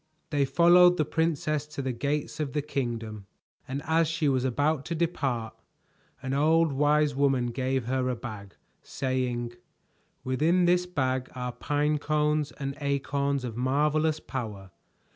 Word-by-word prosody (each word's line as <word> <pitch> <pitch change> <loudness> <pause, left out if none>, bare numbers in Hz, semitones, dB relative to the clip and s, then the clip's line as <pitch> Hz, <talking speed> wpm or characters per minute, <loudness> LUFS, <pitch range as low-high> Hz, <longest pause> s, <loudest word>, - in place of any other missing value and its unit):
They 145 -2 +2
followed 175 +5 +6
the 155 - +2
princess 155 -2 -1
to 150 -2 -6
the 130 - -1
gates 145 +5 -2
of 145 -4 -2
the 150 - -1
kingdom, 115 -7 -4 0.4
and 135 +2 -4
as 160 +1 +3
she 165 -1 0
was 130 -2 +2
about 145 +3 +1
to 170 - -3
depart, 135 -9 -1 0.7
an 130 0 -2
old 160 +3 +3
wise 150 +1 +3
woman 135 -3 +1
gave 130 0 -1
her 130 +1 0
a 125 - -1
bag, 105 -4 -8 0.3
saying: 125 -3 -2 0.7
"Within 155 +8 +2
this 180 +1 +3
bag 130 -6 -1
are 125 -1 -3
pine 150 +3 0
cones 150 0 0
and 140 -1 -5
acorns 140 -1 -1
of 120 -3 -5
marvelous 150 +5 +1
power. 105 -10 -6
140 Hz, 145 wpm, -27 LUFS, 130-155 Hz, 0.7 s, followed